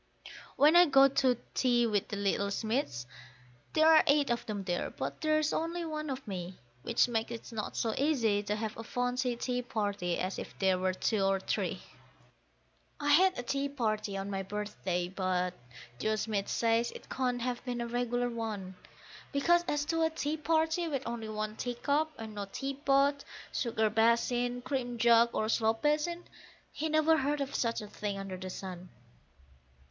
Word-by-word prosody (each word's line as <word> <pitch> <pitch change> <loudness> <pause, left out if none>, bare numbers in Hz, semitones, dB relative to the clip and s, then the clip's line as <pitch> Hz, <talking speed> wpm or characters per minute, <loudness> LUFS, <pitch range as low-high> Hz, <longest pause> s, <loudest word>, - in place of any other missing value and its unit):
When 300 +4 +5
I 350 0 +8
go 275 -1 +7
to 260 -2 +2 0.2
tea 240 -2 +3
with 210 -3 0
the - - -4
little 200 0 0
Smiths, 215 - -2 0.7
there 315 0 +4
are 320 -1 +7
eight 285 -2 +4
of 235 - -1
them 205 -3 -3
there, 175 -2 -2
but - - -5
there's 310 -1 +2
only 335 +1 -2
one 305 -1 -4
of 265 -2 -5
me, 185 -2 -5 0.2
Which 235 - +2
makes 225 -2 -1
it 235 +1 -7
not 220 -2 -4
so 225 -2 0
easy 240 -9 +2
to 210 0 -2
have 215 0 -4
a 225 - -6
fancy 245 +1 -1
tea 250 +1 -2
party 205 -7 -2
as 185 +1 -3
if - - -8
there 190 -2 +2
were 185 0 0
two 210 +1 0
or 195 0 +2
three. - - -2 1.2
I 290 -1 +1
had 370 +5 +5
a 245 - -3
tea 275 +3 -1
party 215 -6 -2
on 195 +1 -4
my 195 -1 -2
birthday, 190 -3 -3
but 185 -1 -1 0.5
Joe 215 +9 +1
Smith 210 -2 -2
says 230 +1 +2
it - - -11
can't 250 -2 -1
have 250 -1 -2
been 245 -2 -3
a 235 - -2
regular 245 +1 -1
one, 215 -5 -4 0.6
Because 345 +5 +3
as 290 0 0
to 330 +1 0
a 320 - +3
tea 310 -1 -2
party 320 +2 +1
with 280 -5 -2
only 230 -1 -4
one 215 0 -3
teacup 285 +5 0
and 220 -1 -7
no 205 -1 -4
teapot, 275 +1 +1 0.3
sugar 220 -3 0
basin, 240 +2 +2
cream 245 -3 -2
jug, 235 0 +5
or 215 - 0
slop 225 +1 +1
basin, 305 +4 +1 0.5
he 315 +2 -3
never 310 +1 +4
heard 290 +1 0
of 280 0 -3
such 230 -1 0
a 210 - -7
thing 205 -1 -4
under 195 -1 -5
the 185 0 -6
sun. 185 -1 -7
235 Hz, 180 wpm, -31 LUFS, 210-280 Hz, 1.2 s, I